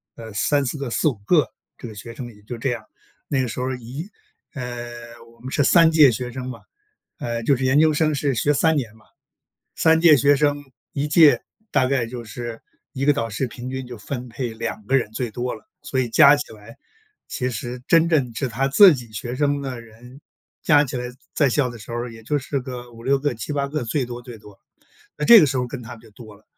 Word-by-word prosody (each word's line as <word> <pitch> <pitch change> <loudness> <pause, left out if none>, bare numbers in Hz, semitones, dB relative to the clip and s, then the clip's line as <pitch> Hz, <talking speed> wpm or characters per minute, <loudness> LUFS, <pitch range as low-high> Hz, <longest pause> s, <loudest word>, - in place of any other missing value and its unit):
呃， 110 -2 -10
3-4 140 +5 0
个、 140 -3 -4
4-5 135 +2 +1
个， 155 -1 +3 0.3
这 120 - -8
个 110 - -10
学 115 +3 -9
生 125 - -7
也 105 - -19
就 120 +2 -7
这 125 +2 -1
样。 120 - -5 0.4
那 135 -2 0
个 125 - -1
时 115 - -6
候 130 +1 -2
一 125 - -8 0.5
呃， 120 -2 -7 0.2
我 - - -27
们 130 - -7
是 145 - +2
3 165 +3 +6
届 150 -5 +7
学 125 +1 -4
生 130 0 -6
嘛， 125 - -8 0.6
呃， 120 -1 -3
就 140 - +3
是 130 - -4
研 135 +3 +4
究 155 -1 +4
生 155 0 +1
是 140 -2 0
学 145 +6 +2
3 160 +3 +2
年 115 -7 -3
嘛， 110 - -22 0.7
3 160 0 +4
届 160 -3 +7
学 145 +3 +4
生， 145 0 +1 0.3
1 145 +1 -2
届 150 -1 +6 0.3
大 130 - +2
概 130 -3 0
就 120 0 -7
是 115 +1 -7 0.3
一 135 -1 -3
个 145 - +5
导 115 -5 -2
师 115 +5 -2
平 120 +1 -8
均 130 -1 -5
就 120 -3 -9
分 125 +3 -6
配 120 -1 -5
2 110 -1 -5
个 135 +3 +3
人 120 -5 -1
最 120 0 -3
多 125 +3 -3
了， 110 - -14 0.2
所 130 - -1
以 125 - -1
加 140 +5 +7
起 145 -5 -6
来 110 +2 -14 0.5
其 125 0 -2
实 120 +2 -6
真 165 0 +5
正 140 -8 +1
是 130 +3 -2
他 130 +4 -1
自 180 +5 +8
己 120 -4 -9
学 120 +3 -5
生 145 +1 0
的 130 -3 -5
人 120 +4 -15 0.4
加 150 -1 +5
起 130 - -5
来 125 0 -4 0.3
在 145 -3 +3
校 130 0 +1
的 120 - -9
时 110 +2 -12
候 120 +1 -3
也 115 -1 -12
就 145 +6 -1
是 140 +1 -3
个 125 -2 -8
5-6 130 +4 0
个、 145 -2 -1
7-8 140 +5 -3
个， 150 -3 -3
最 130 +4 -1
多 120 0 -7
最 120 -2 -10
多， 105 -2 -16 0.6
那 150 - -3
这 230 +5 +10
个 150 - +5
时 135 - -2
候 125 -1 0
跟 125 0 -7
他 120 +1 -9
就 110 - -18
多 110 -2 -13
了。 105 - -26
125 Hz, 230 characters per minute, -22 LUFS, 120-145 Hz, 0.7 s, 这